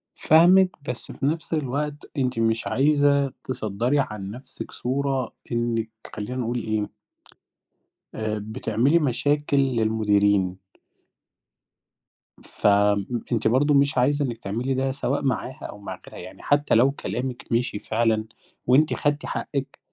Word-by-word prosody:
فاهمِك، 180 +4 +5 0.2
بس 120 - -3
في - - -4
نفس 160 +3 -1
الوقت 145 0 -3
أنتِ 125 -3 0
مش 115 0 +1
عايزة 140 -1 +3
تصدَّري 120 +3 -1
عن 105 -6 -3
نفسِك 130 +4 -8
صورة 135 -1 -2 0.2
إنِّك 120 -1 -1 0.3
خلّينا 110 +4 -5
نقول 120 0 -1
إيه 110 -2 -2 1.2
آآ، 110 -1 -2
بتعملي 115 +7 +1
مشاكل 145 +1 +1
للمديرين. 105 -7 +2 1.9
فم 100 -1 +2 0.3
أنتِ 115 -2 +1
برضه 135 +6 +3
مش 140 +1 +3
عايزة 145 +3 +2
إنِّك 120 -3 -4
تعملي 120 +7 -2
ده 135 +1 0
سواء 135 +1 -1
معاها 130 -1 -2
أو - - -8
مع 95 -2 -8
غيرها، - - -11
يعني - - -12
حتّى 145 0 +2
لو 125 +4 +5
كلامِك 130 -2 -4
مِشِي 115 -2 0
فعلًا 110 -1 0 0.4
وأنتِ 145 +5 +4
خدتي 145 -1 -1
حقِّك، 140 -1 -4
125 Hz, 125 wpm, -24 LUFS, 110-140 Hz, 1.9 s, فاهمِك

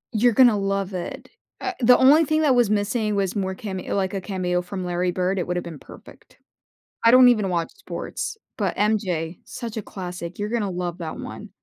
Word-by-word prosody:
You're 240 +2 +4
gonna 240 -3 +6
love 195 -1 -1
it. 180 - -6 0.3
Uh, 380 - -2
the 250 0 +6
only 290 +5 +6
thing 310 +1 +1
that 285 -4 +4
was 240 -4 +3
missing 210 +1 0
was 195 0 -1
more 190 -1 -2
came 195 -3 -5
like 190 +1 -2
a 195 - -2
cameo 180 -2 -1
from 180 +1 -6
Larry 180 +1 0
Bird. 185 +1 -1
It - - -2
would 180 0 -1
have - - -2
been 165 -4 -8
perfect. - - -15 0.7
I 230 - +7
don't 255 0 +8
even 210 -5 +2
watch 170 -2 -1
sports. 400 +2 -5 0.2
But - - -1
MJ, 185 -6 0
such 230 -2 -7
a - - -1
classic. 180 -3 -7
You're 210 +1 -3
gonna 225 -4 -1
love 180 -1 -4
that 160 -2 -5
one. 210 0 -8
195 Hz, 205 wpm, -23 LUFS, 180-225 Hz, 0.7 s, don't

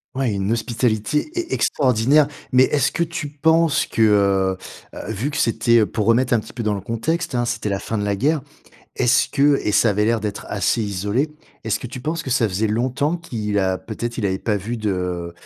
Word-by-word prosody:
Ouais, 130 -3 0
une 100 +1 -1
hospitalité 120 - 0
e 350 -1 -2
extraordinaire. 135 +2 +3 0.2
Mais 130 0 +6
est-ce 145 -1 +1
que - - -3
tu 165 -3 -2
penses 160 +2 +2
que, 115 - +1
heu, 100 -3 +3 0.4
heu, - - -6
vu 115 +8 -2
que 150 - -4
c'était, 115 0 +3
heu, 110 - +4
pour 110 -2 -2
remettre 120 +2 +3
un 115 - +4
petit - - -11
peu 120 - -5
dans 105 -2 0
le 100 - -5
contexte, 115 - -2
hein, 120 -1 +1
c'était 115 -2 -2
la 100 -1 -1
fin 110 +2 -4
de 105 - -1
la 100 0 0
guerre. 145 +8 +1 0.5
Est-ce 125 -2 +3
que 140 0 +3
et 105 - 0
ça 110 +1 +4
avait 105 +1 +1
l'air 115 0 +2
d'être 105 -1 -5
assez 105 +3 0
isolé. 105 - -1 0.3
Est-ce - - -1
que - - -7
tu 125 +1 -7
penses 160 +5 -3
que 135 - -5
ça 120 -4 +2
faisait 95 +4 -1
longtemps 130 +9 0
qu'il 105 -11 -3
a, 95 -1 +1
peut-être, 120 +3 -6
il 110 - -1
avait 95 -1 -1
pas 105 -2 0
vu 115 +5 -4
de, 90 -5 -2
115 Hz, 220 wpm, -21 LUFS, 105-135 Hz, 0.5 s, Mais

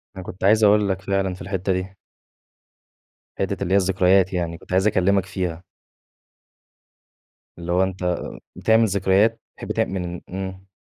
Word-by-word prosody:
أنا 95 - -7
كنت 90 +1 -9
عايز 110 +3 +4
أقول 105 -1 +4
لَك 95 0 -2
فعلًا، 95 -1 -1
في 90 - -11
الحتّة 95 +1 -2
دي. 95 +1 -4 1.4
حتّة 95 0 -2
اللي 95 - -1
هي - - +6
الذكريات 95 0 +3
يعني، 85 -2 -2
كنت - - -17
عايز 95 +3 +3
أكلّمك 95 -1 +2
فيها. 90 -3 -4 1.9
اللي 85 0 -5
هو 90 +2 +3
أنت 90 -2 -1 0.4
بتعمل 110 +1 +3
ذكريات؟ 100 +3 +2 0.2
بتحب - - -6
تعم - - 0
من 90 -2 -4
إمم. 95 +1 -6
95 Hz, 150 wpm, -22 LUFS, 90-100 Hz, 1.9 s, هي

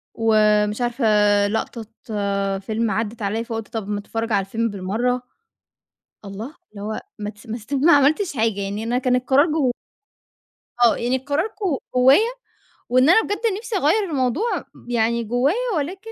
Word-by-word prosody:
ومش 215 0 +2
عارفة 240 +1 -1 0.4
لقطة 225 +1 -3 0.7
فيلم 220 +2 -2
عدِّت 220 0 -3
عليّا، 215 +3 -1
فقُلت 225 -2 -5
طب 215 -3 -4
ما 205 0 -1
أتفرّج 225 +2 -4
على 195 -2 +2
الفيلم 230 +3 -1
بالمرّة. 220 +6 -1 1.0
الله 215 +10 -7 0.2
اللي 200 -1 -10
هو 215 +1 -4 0.2
ما 210 0 -4
تس 215 +3 -18
ما 225 +1 -4
استب 265 +5 -3
ما 340 - +7
عملتش 290 +3 +3
حاجة، 220 -2 0
يعني 200 +3 -3
أنا 245 +2 0
كان 250 -1 +2
القرار 270 +4 +3
جو 300 -6 +1 1.1
آه. 235 - +5
يعني 245 +2 0
القرار 285 - -1
ج - - -22 0.4
جوّايا 275 - +5 0.6
وإن 255 +4 +4
أنا 445 +6 +7
بجد 410 +2 -3 0.2
نفسي 450 -2 -3
أغيّر 370 +7 +2
الموضوع 285 - 0 0.3
يعني 235 0 +1
جوّايا 245 - +1 0.2
ولكن 385 +9 -4
235 Hz, 155 wpm, -22 LUFS, 215-280 Hz, 1.1 s, ما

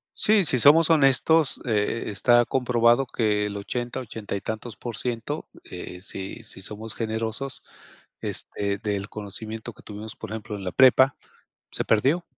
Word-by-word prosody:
Sí, 210 -4 +4
si 130 - +3
somos 155 +6 +6
honestos, 155 0 +4
eh, 110 -1 0
está 120 +4 +4
comprobado 120 0 +3
que 105 -4 0
el 100 0 -4
80, 120 +5 -4
80 110 -4 -6
y 100 - -4
tantos 110 +1 -5
por 115 +1 -5
ciento 125 +5 -3 0.2
eh, 90 0 -8
si 95 +3 -7
si 95 - -9
somos 105 +2 -7
generosos, 115 +4 -3 0.6
este, 100 -1 -1
del 105 -1 -3
conocimiento 110 +2 -7
que - - -18
tuvimos, 105 +1 -8
por - - -8
ejemplo, 110 -1 -5
en 95 - -8
la 90 - -3
prepa, 130 +1 +5 0.6
se - - -3
perdió. 140 +11 +2
115 Hz, 155 wpm, -25 LUFS, 105-130 Hz, 0.6 s, somos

